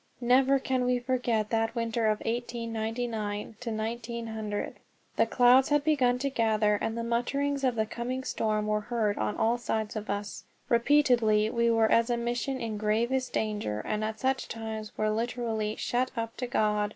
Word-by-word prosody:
Never 260 Hz, +3 st, +4 dB
can 260 Hz, -1 st, -1 dB
we 250 Hz, 0 st, +2 dB
forget 245 Hz, -4 st, -1 dB
that 225 Hz, +1 st, 0 dB
winter 230 Hz, -1 st, 0 dB
of 215 Hz, -1 st, +1 dB
1899 225 Hz, -2 st, -3 dB
1900. 225 Hz, -2 st, -4 dB, 0.4 s
The -, -, +3 dB
clouds 255 Hz, +1 st, +5 dB
had 295 Hz, -1 st, +3 dB
begun 265 Hz, -5 st, +3 dB
to 275 Hz, +2 st, -2 dB
gather, 215 Hz, -3 st, +2 dB
and 225 Hz, +1 st, -2 dB
the 230 Hz, -, -2 dB
mutterings 275 Hz, +4 st, -1 dB
of 255 Hz, -2 st, +2 dB
the 220 Hz, -1 st, +1 dB
coming 245 Hz, +3 st, -4 dB
storm 215 Hz, -4 st, -1 dB
were 210 Hz, 0 st, 0 dB
heard 215 Hz, -2 st, -1 dB
on 105 Hz, -1 st, -1 dB
all 235 Hz, +2 st, +2 dB
sides 220 Hz, -2 st, -2 dB
of 215 Hz, -1 st, -5 dB
us. 205 Hz, 0 st, -4 dB, 0.3 s
Repeatedly 235 Hz, -4 st, +3 dB
we 235 Hz, 0 st, +2 dB
were 225 Hz, -1 st, +3 dB
as 230 Hz, +1 st, +4 dB
a 240 Hz, -, +1 dB
mission 240 Hz, +3 st, -2 dB
in 220 Hz, -3 st, -4 dB
gravest 235 Hz, +5 st, 0 dB
danger, 210 Hz, -, -1 dB
and 215 Hz, 0 st, -1 dB
at 220 Hz, 0 st, -3 dB
such 265 Hz, 0 st, 0 dB
times 220 Hz, -1 st, -5 dB
were 215 Hz, 0 st, +1 dB
literally 225 Hz, -1 st, -2 dB
"shut 255 Hz, +1 st, 0 dB
up 230 Hz, 0 st, -3 dB
to 250 Hz, -, -3 dB
God." 210 Hz, -3 st, +1 dB
230 Hz, 170 wpm, -29 LUFS, 215-245 Hz, 0.4 s, clouds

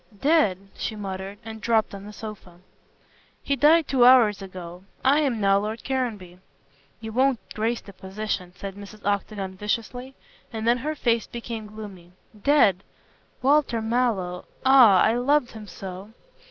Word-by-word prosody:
"Dead!" 290 Hz, -, +3 dB, 0.2 s
she 220 Hz, -, -4 dB
muttered, 195 Hz, -1 st, -6 dB
and 220 Hz, -1 st, -8 dB
dropped 225 Hz, -3 st, +1 dB
on 200 Hz, -, -7 dB
to 200 Hz, -, -11 dB
the -, -, -8 dB
sofa. 205 Hz, -5 st, -10 dB, 0.8 s
"He 280 Hz, -, 0 dB
died 305 Hz, +4 st, +4 dB
two 260 Hz, -3 st, +3 dB
hours 235 Hz, -5 st, +6 dB
ago. 180 Hz, -2 st, -9 dB, 0.2 s
I 280 Hz, +3 st, +5 dB
am 270 Hz, -7 st, 0 dB
now 195 Hz, -1 st, +3 dB
Lord 215 Hz, +3 st, -5 dB
Caranby." 215 Hz, -10 st, -3 dB, 0.6 s
"You 220 Hz, 0 st, -7 dB
won't 260 Hz, +1 st, +3 dB, 0.2 s
grace 225 Hz, +2 st, -1 dB
the 200 Hz, -, -13 dB
position," 190 Hz, -1 st, -5 dB
said 195 Hz, -1 st, -7 dB
Mrs. 205 Hz, +1 st, -12 dB
Octagon 200 Hz, -1 st, -2 dB
viciously, 230 Hz, +6 st, -4 dB, 0.4 s
and 225 Hz, -1 st, -4 dB
then 240 Hz, +1 st, +3 dB
her 305 Hz, +5 st, -3 dB
face 235 Hz, -5 st, 0 dB
became 230 Hz, -2 st, -6 dB
gloomy. 200 Hz, -5 st, -11 dB, 0.3 s
"Dead! 205 Hz, -, +4 dB, 0.6 s
Walter 275 Hz, -4 st, +3 dB
Mallow. 220 Hz, -6 st, -1 dB, 0.2 s
Ah! 245 Hz, -8 st, +7 dB
I 220 Hz, -, +3 dB
loved 250 Hz, +2 st, +1 dB
him 215 Hz, -2 st, -10 dB
so." 190 Hz, +1 st, -8 dB
220 Hz, 155 wpm, -24 LUFS, 195-245 Hz, 0.8 s, Ah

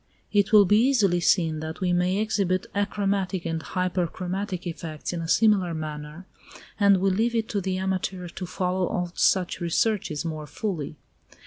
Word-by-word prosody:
It 205 Hz, -1 st, +3 dB
will 210 Hz, -2 st, +8 dB
be 210 Hz, +3 st, +4 dB
easily 215 Hz, -9 st, +3 dB
seen 165 Hz, -3 st, +2 dB
that 160 Hz, +1 st, -6 dB
we 180 Hz, -1 st, +1 dB
may 180 Hz, +2 st, +1 dB
exhibit 200 Hz, -4 st, 0 dB
achromatic 200 Hz, -3 st, -1 dB
and 165 Hz, -1 st, -2 dB
hyperchromatic 185 Hz, +1 st, -2 dB
effects 160 Hz, -1 st, -5 dB
in 170 Hz, -, -3 dB
a 165 Hz, -, -4 dB
similar 195 Hz, -3 st, +3 dB
manner, 155 Hz, +2 st, -6 dB, 0.5 s
and 200 Hz, -2 st, +5 dB
we 195 Hz, +1 st, +2 dB
leave 230 Hz, +5 st, +1 dB
it 225 Hz, -1 st, 0 dB
to 205 Hz, -3 st, -1 dB
the 185 Hz, 0 st, -2 dB
amateur 185 Hz, -1 st, -2 dB
to 180 Hz, +2 st, -6 dB
follow 180 Hz, 0 st, -1 dB
out 175 Hz, -1 st, -3 dB
such 185 Hz, -2 st, +2 dB
researches 170 Hz, -2 st, 0 dB
more 155 Hz, -2 st, -4 dB
fully. 155 Hz, -1 st, -4 dB
185 Hz, 160 wpm, -25 LUFS, 170-200 Hz, 0.5 s, will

